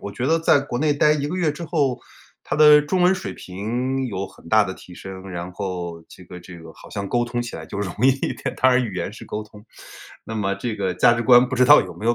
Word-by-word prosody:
我 100 - -6
觉 125 - -3
得 165 +3 +3
在 160 -3 +3
国 130 -3 -4
内 150 +1 +1
待 150 +1 +4
1 145 -1 -1
个 180 - -4
月 165 -5 +1
之 160 +4 -9
后， 145 -6 -1 0.4
他 - - -3
的 150 -1 +7
中 165 +5 -1
文 180 +2 +4
水 190 - -6
平 125 +8 -3
有 100 -3 -4
很 85 - -17
大 110 +2 +4
的 95 - -5
提 90 - -14
升。 95 +1 -9
然 90 0 -6
后 90 -3 -5
这 90 - -14
个 90 +1 -11
这 85 0 -12
个 80 0 -12
好 - - -15
像 100 -1 -4
沟 120 0 +1
通 120 0 -3
起 120 - -8
来 - - -9
就 - - -7
容 95 -4 -4
易 130 - +6
一 135 0 0
点， 130 - -5
当 130 0 +4
然 125 0 +3
语 100 -5 -6
言 95 - -4
是 - - -11
沟 105 - -5
通。 105 0 -16 0.6
那 110 - -7
么 100 -2 -1
这 110 +3 -4
个 95 -3 -2
价 105 - +4
值 120 0 -1
观 125 +1 +6
不 130 - -3
知 125 - +4
道 145 - +8
有 - - -9
没 110 - -6
有 120 - +3
120 Hz, 295 characters per minute, -22 LUFS, 95-140 Hz, 0.6 s, 道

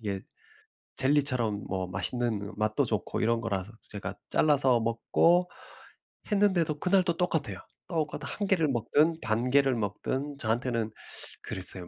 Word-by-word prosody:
이게 100 -3 -3 0.8
젤리처럼 130 -7 +1
뭐 95 -2 -2
맛있는 110 +4 -1
그 100 +2 -7
맛도 110 0 +1
좋고 - - -2
이런 115 +1 +2
거라서 100 -3 -3
제가 100 - -6
잘라서 135 -5 +4
먹고 165 +10 +2 0.8
했는데도 180 -7 +2
그날도 180 -2 +2
똑같아요. 150 - 0 0.3
똑같은 155 -4 -2
1 205 - -3
개를 175 -5 +3
먹든 145 +7 +2
반 110 +3 0
개를 135 -1 +4
먹든 130 +7 -3
저한테는 115 -1 -1 0.5
그랬어요. 90 -1 -2
120 Hz, 295 characters per minute, -29 LUFS, 110-155 Hz, 0.8 s, 잘라서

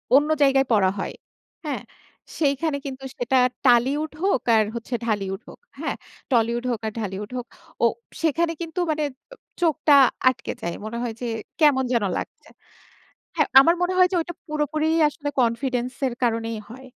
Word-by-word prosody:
অন্য 295 +2 +4
জায়গায় 270 -1 +4
পড়া 195 -4 +4
হয়, - - -3 0.5
হ্যাঁ? 295 - -3 0.6
সেইখানে 285 0 +1
কিন্তু 270 -1 -6
সেটা 250 +2 +1 0.3
টালিউড 265 +6 +3
হোক, 385 -10 +2
আর 215 - +5
হচ্ছে 235 +1 -4
ঢালিউড 195 -3 -2
হোক, - - -13 0.2
হ্যাঁ? - - -2 0.4
টলিউড 235 0 +2
হোক 235 - -1
আর - - -2
ঢালিউড 205 0 -4
হোক। 245 - -4 0.4
ও - - +7 0.4
সেখানে 330 +1 +1
কিন্তু 335 +2 -4
মানে 305 0 -1 0.3
ও - - -12 0.3
চোখটা 315 -3 +3 0.4
আটকে 255 -2 -4
যায়। 170 0 -3
মনে 235 +2 -5
হয় 235 -2 -3
যে, - - -3 0.3
কেমন 285 -4 +5
যেন 235 - +2
লাগছে - - -7 0.9
হ্যাঁ, - - +2
আমার 335 +5 +5
মনে 360 +1 +1
হয় 365 0 +6
যে, - - +1
ওইটা 345 +1 -5
পুরোপুরিই 305 +1 0
আসলে 290 0 -6
কনফিডেন্স 245 +1 0
এর 250 - -2
কারণেই 230 -1 0
হয়। 260 +3 -11
265 Hz, 165 wpm, -24 LUFS, 235-305 Hz, 0.9 s, ও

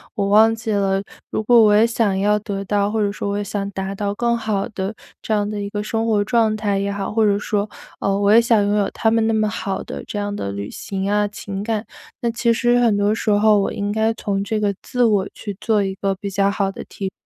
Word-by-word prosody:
我 200 -4 0
忘 220 +2 +6
记 225 0 -6
了， 195 -1 +1 0.3
如 - - -2
果 240 +3 +4
我 210 -1 +5
也 220 +2 +5
想 215 -4 0
要 210 +1 +3
得 200 -2 -4
到， 205 +1 +1
或 220 - -1
者 205 - +1
说 200 0 -4
我 200 - -1
也 205 - -2
想 200 0 -4
达 190 0 -4
到 200 0 -2
更 235 +2 0
好 215 -3 -1
的 200 -2 -4 0.3
这 220 - -2
样 205 -1 +1
的 210 -1 -4
一 200 - -4
个 205 0 -3
生 225 +1 -2
活 215 -2 +2
状 225 0 +2
态 205 -2 0
也 200 +1 -1
好， 200 -1 -3
或 220 0 +3
者 205 -1 +2
说， 210 0 -1 0.3
呃， 195 0 +1
我 205 +1 +4
也 230 - +8
想 230 -3 +3
拥 205 - +1
有 205 -2 +1
他 225 - +1
们 225 0 +2
那 225 - +1
么 215 -1 +2
好 200 -3 -3
的 - - -7
这 205 - -4
样 205 0 -3
的 100 - -4
旅 100 +1 -5
行 195 0 -4
啊 210 0 +2
情 200 -1 -6
感。 220 0 -2 0.3
那 235 - -1
其 235 0 +1
实 240 +1 +2
很 225 -4 +3
多 205 +1 +2
时 225 - -2
候 210 +1 +4
我 - - -1
应 205 0 -2
该 220 +1 +1
从 200 -2 -2
这 215 +1 -1
个 205 -1 +1
自 250 -1 0
我 205 -3 +2
去 205 - -6
做 215 -3 +2
一 195 -1 -2
个 195 0 -1
比 200 +1 -5
较 195 0 +2
好 200 -1 -1
的 - - -8
提 195 -1 -5
205 Hz, 280 characters per minute, -20 LUFS, 200-220 Hz, 0.3 s, 也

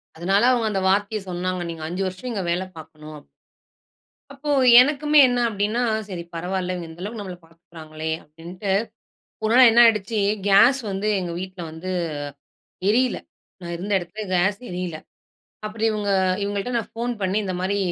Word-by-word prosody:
அதனால, 190 +5 +1
அவங்க 235 -3 +1
அந்த 195 -2 -1
வார்த்தைய 205 +2 0
சொன்னாங்க. 180 0 -3
நீங்க 165 -1 -7
5 180 +3 -2
வருஷம் 185 +7 -6
இங்க 200 -5 -3
வேல 180 +2 -1
பாக்கணும். 155 -1 -12 1.1
அப்போ, 280 +2 -7 0.3
எனக்குமே 295 +3 +4
என்ன 245 -1 0
அப்படினா, 210 +3 -1 0.3
சரி 180 -4 -6
பரவாயில்ல 180 +2 -2
இவங்க 175 -2 -6
இந்த 160 +2 -12
அளவு 215 +3 -6
நம்மள 190 -3 -6
பாத்துகிறாங்களே 160 -1 -9
அப்டின்டு. 170 +6 -7 0.7
ஒரு 220 - +1
நாள் 255 -1 +8
என்ன 235 +1 +6
ஆய்டுச்சி 215 -1 +2 0.3
கேஸ் 225 +7 +6
வந்து 195 +2 -2
எங்க 175 -2 -4
வீட்ல் 185 -2 -7
வந்து 160 +4 -7 1.0
எரியல. 250 +3 +2 0.4
நான் 170 -1 -6
இருந்த 190 +5 -5
எடத்துல 180 +5 -7
கேஸ் 190 +3 +2
எரியல. 180 -2 -4 0.7
அப்பறம் 220 +1 -1
இவங்க 210 -1 -2 0.3
இவங்கள்ட 200 +4 -3
நான் 230 - -5
போன் 240 +1 -1
பண்ணி 190 +1 0
இந்த 190 -2 -3
மாரி 195 +2 0
195 Hz, 155 wpm, -23 LUFS, 175-215 Hz, 1.1 s, நாள்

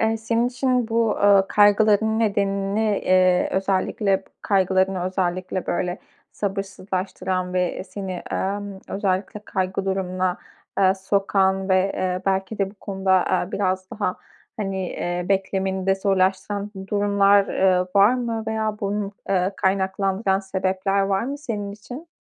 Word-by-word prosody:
Eee, 225 0 +2
senin 230 +2 0
için 250 -1 0
bu, 230 -1 +2
ııı, 200 -1 +4
kaygıların 210 +1 +4
nedenini, 200 -1 0 0.2
eee, 185 -1 +4
özellikle 195 +1 +1
p - - -27
kaygılarını 190 -1 +1
özellikle, 185 0 -2
böyle, 180 +1 -1 0.3
sabırsızlaştıran 190 -2 -3
ve 180 0 -1
seni, 195 -1 -6 0.2
emm, 200 0 -3
özellikle 195 +1 -2
kaygı 190 0 -2
durumuna, 185 -1 -1 0.4
eee, 190 -1 +4
sokan 195 0 +1
ve, 190 +1 +3
eee, 185 0 -2
belki 195 +2 -1
de 195 -1 0
bu 205 - -19
konuda, 190 -2 +1 0.2
eee, 180 - -12
biraz 185 -1 -1
daha, 195 -3 -2 0.4
hani, 195 -3 -2
eee, 175 0 -3
beklemeni 190 -1 0
de 195 - +4
zorlaştıran 195 +1 0 0.2
durumlar, 200 -1 +4
eee, 185 -1 +2
var 205 +5 +6
mı 230 -3 -2
veya 220 -1 -1
bunu, 200 0 -2 0.2
eee, 190 0 +1
kaynaklandıran 190 +1 0
sebepler 190 0 -1
var 195 0 +1
mı 275 +4 -4
senin 210 -8 -4
için? 250 +10 -10
195 Hz, 130 wpm, -23 LUFS, 190-205 Hz, 0.4 s, var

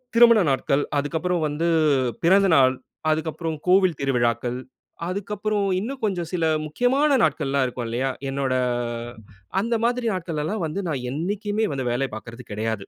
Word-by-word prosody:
திருமண 235 -2 +7
நாட்கள், 140 +1 +1
அதுக்கப்புறம் 165 +4 -1
வந்து 150 +3 -1 0.6
பிறந்த 195 +4 +5
நாள், 130 -1 +5 0.4
அதுக்கப்புறம் 160 +1 -2
கோவில் 185 -3 +4
திருவிழாக்கள், 120 -2 0 0.5
அதுக்கப்புறம் 205 +2 -2
இன்னும் 260 +7 -5
கொஞ்சம் 175 -5 -2
சில 170 -2 0 0.2
முக்கியமான 265 - +2
நாட்கள்லாம் 140 0 +1
இருக்கும் 125 -1 -5
இல்லையா? 130 +3 -1 0.2
என்னோட 135 -1 -1 1.1
அந்த 230 +2 0
மாதிரி 245 0 0
நாட்களலாம் 170 +3 -3
வந்து, 185 +6 -3
நான் 135 -4 -2
என்னைக்குமே 205 +7 -1
வந்து 135 -2 -3
வேலைய 130 +2 -1
பார்க்கறது 115 +2 -9
கெடையாது. 110 -1 -2
160 Hz, 130 wpm, -24 LUFS, 135-205 Hz, 1.1 s, திருமண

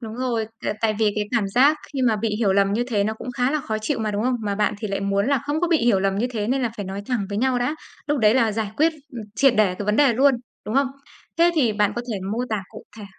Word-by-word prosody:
Đúng 225 -2 -7
rồi, 245 -3 -1 0.2
t - - -5
tại 220 -1 +1
vì 215 -2 +2
cái 210 - -1
cảm 205 -4 0
giác 270 +8 +4 0.2
khi 270 -2 -2
mà 230 -4 +3
bị 215 0 -1
hiểu 205 -4 +2
lầm 200 0 +2
như 230 +4 +1
thế 210 -5 0
nó 220 +1 -1
cũng 250 - -7
khá 250 +1 0
là 305 +1 0
khó 220 -5 -3
chịu 215 +1 -2
mà, 215 -1 -1
đúng 205 0 -2
không? 255 +2 +1
Mà 205 -2 -2
bạn 210 +1 +1
thì 215 - -4
lại 200 0 -2
muốn 200 +1 0
là 280 -2 +2
không 295 +2 -1
có 355 - +1
bị 330 -2 +3
hiểu 230 -6 +2
lầm 195 0 0
như 235 - +1
thế 215 -3 -3
nên 265 +1 +1
là 235 - 0
phải 205 - -4
nói 195 +1 -5
thẳng 230 -6 -1
với 200 0 -3
nhau 255 +1 +1
đã. 245 +5 -1 0.3
Lúc 295 -1 0
đấy 215 -2 +4
là 230 -4 +3
giải 215 -1 -2
quyết, 320 +2 +3 0.2
ừm, 235 -3 -6
triệt 270 +3 +4
để 205 -4 +3
cái 205 - -5
vấn 210 +1 +2
đề 285 -4 +5
luôn, 270 +3 +4 0.3
đúng 215 - -3
không? 275 +1 +3 0.5
Thế 340 +1 +5
thì 245 -9 +2
bạn 210 -1 +1
có 240 - -2
thể 200 - -3
mô 225 - -2
tả 215 -3 -1
cụ 215 - -11
thể 210 - -8
225 Hz, 310 wpm, -23 LUFS, 210-255 Hz, 0.5 s, đề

